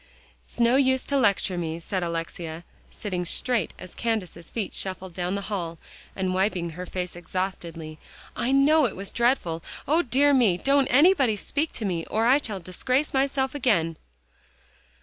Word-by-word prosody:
"It's - - -13
no 235 +2 +5
use 260 -1 +3
to 280 - -2
lecture 200 -7 +2
me," 165 -1 -3
said 185 +2 -3
Alexia, 165 -1 -4 0.3
sitting 185 -5 -4
straight 220 +2 0
as 180 - -11
Candace's 195 -8 -3
feet 220 -4 -4
shuffled 190 -1 -4
down 180 +2 -2
the 200 - -2
hall, 180 -5 -4 0.4
and 185 -1 -1
wiping 185 -3 0
her 180 +3 -7
face 180 -1 -4
exhaustedly. 170 -3 -5 0.4
"I 245 - 0
know 285 +3 +5
it - - -7
was 195 +1 -6
dreadful 235 -10 +1 0.3
O 315 +5 +4
dear 280 +1 +3
me! 230 -10 +4
Don't 275 +5 +3
anybody 275 - +5
speak 295 +9 -2
to 220 - -3
me, 175 -4 -1
or 220 +1 0
I 260 +4 +5
shall 210 -8 -4
disgrace 255 - -1
myself 265 -1 +1
again!" 205 - +1
200 Hz, 165 wpm, -26 LUFS, 175-260 Hz, 0.4 s, no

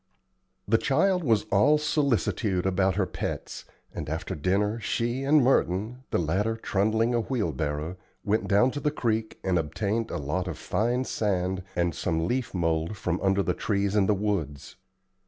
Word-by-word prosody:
The 115 +2 +3
child 180 +6 +2
was 110 -7 +3
all 135 +10 +5
solicitude 120 - 0
about 95 -1 +2
her 100 -1 +1
pets, 90 - -5 0.3
and - - -5
after - - -3
dinner 100 +8 0
she 120 +3 -1
and 145 0 +4
Merton, 115 -1 +1
the - - +1
latter 95 +7 0
trundling 110 +3 +1
a 120 - +2
wheelbarrow, 85 - -2 0.3
went 105 +1 0
down 110 +6 +4
to 145 - -4
the 150 - +1
creek 115 -6 -2
and 95 -2 +2
obtained 105 +8 -2
a - - -3
lot 75 +6 -2
of 85 - -4
fine 120 +3 0
sand 95 -6 -1
and 85 -1 +1
some 80 +1 -1
leaf 125 +2 -1
mould 85 +2 -1
from 90 -2 -2
under 95 0 +2
the - - 0
trees 100 -1 -1
in 100 -2 +3
the 105 - +3
woods. 95 -9 -3
105 Hz, 165 wpm, -27 LUFS, 90-115 Hz, 0.3 s, all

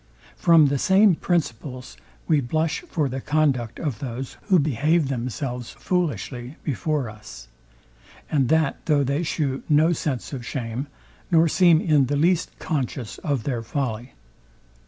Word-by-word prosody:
From 165 -3 +5
the 140 -1 +1
same 195 +4 +5
principles 135 -7 -3 0.3
we 155 -3 +3
blush 155 +5 -1
for 155 - 0
the 130 +1 -4
conduct 140 -7 0
of 140 -10 -3
those, 130 0 -5
who 190 -3 +5
behave 150 +1 +1
themselves 125 -1 -4
foolishly 140 - -3
before 145 -1 -1
us; 105 - -11 0.8
and 135 -5 +1
that 160 -3 +1
though 150 -3 +3
they 140 +4 0
shew 145 -5 -2
no 155 +3 +4
sense 145 -4 -3
of 130 -3 -5
shame, 120 +2 -4 0.4
nor 165 -2 +5
seem 170 0 +5
in 150 -6 +3
the 145 - 0
least 170 +3 +1
conscious 125 -7 -3
of 140 -6 -2
their 125 -5 -2
folly. 120 -1 -4
140 Hz, 140 wpm, -24 LUFS, 125-160 Hz, 0.8 s, From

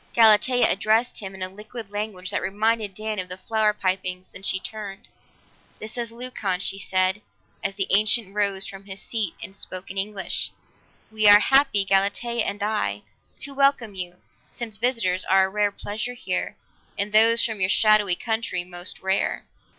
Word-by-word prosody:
Galatea 235 +2 +5
addressed 220 +5 +1
him 195 -2 -7
in 190 - -5
a - - -1
liquid 210 +2 -9
language 205 -3 -4
that - - -1
reminded 210 +1 0
Dan 215 0 -3
of 185 -1 -4
the 180 - -5
flower 215 +2 +1
pipings; 185 -2 -3
then - - -10
she 190 -1 0
turned. 205 -1 -8 0.7
"This 215 0 -7
is 235 -2 -3
Leucon," 230 -6 -3
she 195 0 -2
said, 185 +1 +1 0.4
as 195 0 -1
the 195 -1 0
ancient 210 0 +3
rose 200 -2 0
from 195 0 -9
his 195 -1 -7
seat 215 -6 -3
and 195 - -8
spoke 185 -1 -7
in 195 - -3
English. 200 -1 -2 0.6
"We 215 -1 +3
are 205 0 +10
happy, 270 -4 +4
Galatea 200 +4 +1
and 205 0 -3
I, 155 - -1 0.4
to 280 +3 -1
welcome 275 -6 +2
you, 180 -2 -5 0.4
since 225 -3 -4
visitors 220 -6 +1
are 190 0 +4
a - - -4
rare 205 +1 +1
pleasure 215 +4 -4
here, 245 - -3 0.4
and 205 +1 -1
those 230 +2 +6
from 220 -3 -3
your 185 - +2
shadowy 210 -3 +4
country 220 -4 -2
most 175 0 -4
rare." 190 +1 -1
205 Hz, 175 wpm, -24 LUFS, 190-220 Hz, 0.7 s, are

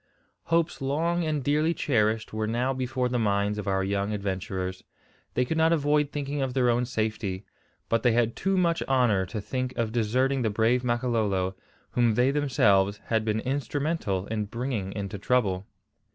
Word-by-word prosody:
Hopes 165 -2 +1
long 165 +6 0
and 155 -3 -1
dearly 150 +4 +2
cherished 110 -4 +1
were 110 0 -1
now 125 +4 0
before 130 -1 -1
the 125 0 -1
minds 105 -1 +1
of 105 - -5
our 95 -1 +1
young 100 +2 -1
adventurers. 95 -2 -3 0.5
They 125 - +2
could 160 +5 -1
not 160 +1 +4
avoid 150 -2 +2
thinking 145 -1 -3
of 130 -1 -2
their 125 -2 +3
own 120 +1 +1
safety. 110 -5 -2 0.4
But 115 -1 +1
they 120 -1 +3
had 115 -1 +1
too 195 0 0
much 170 -2 +2
honour 115 -8 +3
to 105 - -4
think 130 +5 -3
of 115 -2 0
deserting 125 +4 +1
the 110 - +1
brave 115 +4 +2
Makololo, 110 -6 0 0.4
whom 120 -3 +2
they 125 +3 +3
themselves 100 -9 +2
had 110 -1 +3
been 110 0 0
instrumental 140 - -1
in 110 -1 -2
bringing 115 -3 -3
into 100 -1 -5
trouble. 100 -4 +1
120 Hz, 170 wpm, -27 LUFS, 105-135 Hz, 0.5 s, not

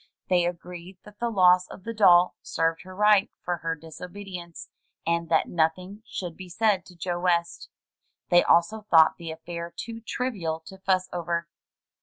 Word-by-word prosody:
They 175 -1 +3
agreed 175 +1 -8
that 210 0 -16
the 235 - 0
loss 180 -3 +5
of 185 - -12
the 230 - -5
doll 180 -5 +5
served 165 0 -1
her 185 0 -11
right 210 0 +4
for 175 0 -1
her 165 0 -3
disobe 165 +4 -10
dience, 175 -3 -8 0.4
and 170 0 0
that 160 - +3
nothing 180 +5 -1
should 175 -5 -5
be 185 -1 -10
said 200 0 +1
to 180 - -15
Joe 175 +1 -3
West. 170 -1 0 0.6
They 175 0 +6
also 175 +6 +3
thought 160 -2 +6
the 170 -1 -7
affair 170 +1 -6
too 230 0 -6
trivial 200 -11 -3
to 190 +4 -13
fuss 185 -1 +1
over. 170 -1 -2
180 Hz, 170 wpm, -26 LUFS, 170-190 Hz, 0.6 s, They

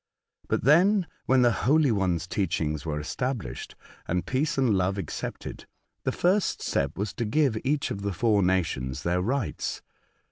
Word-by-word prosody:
But - - 0
then, 180 - +5 0.2
when 130 -1 +5
the 120 - +5
Holy 135 - +3
One's 90 -5 0
teachings 80 -5 -1
were 75 -1 -1
established, 125 - -4 0.3
and 90 +1 -1
peace 140 +4 0
and 130 -5 +3
love 95 +1 +1
accepted, 100 - -6 0.4
the - - +2
first 190 +3 +1
step - - -1
was 100 +1 -2
to 120 - -3
give 130 +2 +2
each 140 +2 0
of 100 - -4
the 100 0 -1
four 105 +2 +2
natioDS 75 -8 0
their 90 +1 +1
rights. 120 +3 -2
105 Hz, 155 wpm, -27 LUFS, 90-135 Hz, 0.4 s, then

